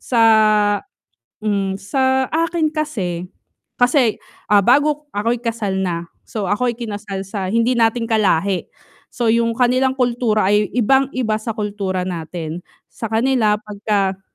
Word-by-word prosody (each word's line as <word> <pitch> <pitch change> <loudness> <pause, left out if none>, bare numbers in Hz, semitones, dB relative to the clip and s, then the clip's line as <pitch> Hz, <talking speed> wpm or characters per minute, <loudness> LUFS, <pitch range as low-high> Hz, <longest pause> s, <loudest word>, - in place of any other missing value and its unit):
sa 235 -3 +1 1.2
hmm 200 -2 -1
sa 260 +4 +1
akin 330 0 0
kasi, 195 - -3 0.5
kasi 245 -2 +3 0.3
ah, 205 -1 +6
bago 290 +7 +2
ako'y 230 +3 0
kasal 225 -5 -2
na, 170 -2 -2 0.2
so 215 -3 -4
ako'y 240 +4 +1
kinasal 205 -4 -5
sa 195 -1 -4
hindi 230 +4 +2
natin 230 +1 +2
ka-lahi, 200 -4 +1 0.4
so 235 -3 0
yung 230 0 +1
kanilang 255 +1 +2
kultura 235 -5 +1
ay 210 0 +2
ibang-iba 250 -2 +1
sa 225 -1 -4
kultura 200 -3 -2
natin, 165 -1 -5 0.3
sa 225 - -5
kanila 225 -2 +2
pagka 200 -2 -1
220 Hz, 125 wpm, -19 LUFS, 195-250 Hz, 1.2 s, ah